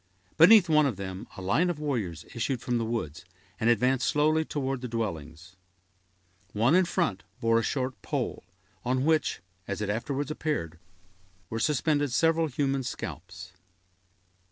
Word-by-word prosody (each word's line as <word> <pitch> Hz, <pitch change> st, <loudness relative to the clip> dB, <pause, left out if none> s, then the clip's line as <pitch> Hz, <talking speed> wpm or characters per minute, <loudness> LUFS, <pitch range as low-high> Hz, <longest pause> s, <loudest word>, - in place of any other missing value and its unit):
Beneath 185 Hz, +3 st, +8 dB
one 155 Hz, -2 st, +4 dB
of 125 Hz, -, -2 dB
them, 95 Hz, -1 st, -6 dB
a 95 Hz, -, -7 dB
line 130 Hz, -, +2 dB
of 175 Hz, -, -2 dB
warriors 110 Hz, -, -3 dB
issued 120 Hz, +2 st, -1 dB
from 120 Hz, 0 st, -1 dB
the 115 Hz, -, -1 dB
woods, 110 Hz, -10 st, -4 dB, 0.4 s
and 115 Hz, -, +2 dB
advanced 125 Hz, +2 st, +2 dB
slowly 155 Hz, +2 st, +3 dB
toward 135 Hz, -4 st, -3 dB
the 125 Hz, -, -4 dB
dwellings. 90 Hz, -6 st, -5 dB, 1.0 s
One 115 Hz, +7 st, +3 dB
in 185 Hz, +1 st, +5 dB
front 170 Hz, -, -1 dB, 0.2 s
bore 115 Hz, 0 st, +3 dB
a -, -, 0 dB
short 130 Hz, +2 st, -2 dB
pole, -, -, -3 dB, 0.4 s
on 130 Hz, +2 st, 0 dB
which, 160 Hz, -1 st, +1 dB, 0.3 s
as 100 Hz, -, -3 dB
it 105 Hz, -1 st, -1 dB
afterwards 140 Hz, +6 st, -2 dB
appeared, 85 Hz, -, -3 dB, 0.7 s
were 110 Hz, -, -2 dB
suspended 145 Hz, 0 st, +1 dB
several 165 Hz, +4 st, +3 dB
human 135 Hz, -1 st, 0 dB
scalps. 90 Hz, -6 st, -7 dB
125 Hz, 150 wpm, -28 LUFS, 105-150 Hz, 1.0 s, Beneath